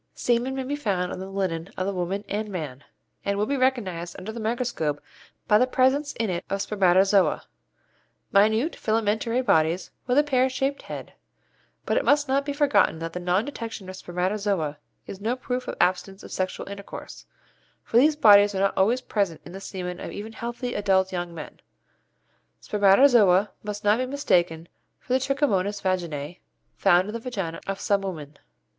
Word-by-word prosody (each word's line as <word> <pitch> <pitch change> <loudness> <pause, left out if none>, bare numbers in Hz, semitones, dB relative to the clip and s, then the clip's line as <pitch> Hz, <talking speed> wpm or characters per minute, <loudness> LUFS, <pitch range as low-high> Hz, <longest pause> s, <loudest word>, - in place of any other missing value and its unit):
Semen 245 +2 0
may 265 - -2
be 280 +3 -2
found 195 -10 -1
on - - -5
the 190 +1 -6
linen 185 -3 -2
of 185 - -1
the 200 - -1
woman 190 +3 -3
and 210 +1 -3
man, 150 -8 -6 0.4
and 200 0 -1
will 210 - +1
be 280 - -1
recognized 200 -11 -1
under 195 +4 -6
the 230 - -7
microscope 220 - -1 0.5
by 210 - +5
the 250 - +3
presence 270 +3 +2
in 225 - -2
it 175 0 -3
of 195 - -1
spermatozoa, 195 -1 +3 0.9
minute 220 +9 +3
filamentary 225 +3 0
bodies 160 -1 +2 0.2
with 250 +1 +2
a 295 - +6
pear 260 -3 +2
shaped 270 +2 -2
head; - - -8 0.7
but - - +1
it - - +2
must 290 0 +3
not 275 +1 +1
be - - 0
forgotten 285 - +3
that 165 0 -5
the 180 - -4
non 180 +4 +1
detection 230 -8 -6
of 185 - -7
spermatozoa 180 -4 -2 0.3
is 195 - -9
no 230 +4 0
proof 250 0 -4
of - - -4
absence 185 +2 0
of - - -11
sexual 185 0 -3
intercourse, 200 0 -9 0.6
for 230 - 0
these 300 +5 +5
bodies 205 -6 +6
are - - -1
not 195 - +2
always 230 +7 +2
present 200 -9 -1
in - - -10
the 195 +2 -8
semen 180 -2 -5
of - - -6
even 215 +2 -7
healthy 240 +2 -4
adult 190 -2 +2
young 175 -1 -3
men. 165 -2 -9 1.0
Spermatozoa 205 -1 +4
must 210 0 -6
not 210 +3 +3
be 255 - -1
mistaken 175 - 0 0.3
for 255 - -4
the 260 - +4
Trichomonas 250 -8 0
vaginæ 175 -4 -2 0.4
found 185 -1 +4
in - - -5
the 230 - -3
vaginæ 195 -9 -4
of 195 0 -3
some 200 -1 +1
women. 155 -7 -7
200 Hz, 180 wpm, -25 LUFS, 185-245 Hz, 1.0 s, a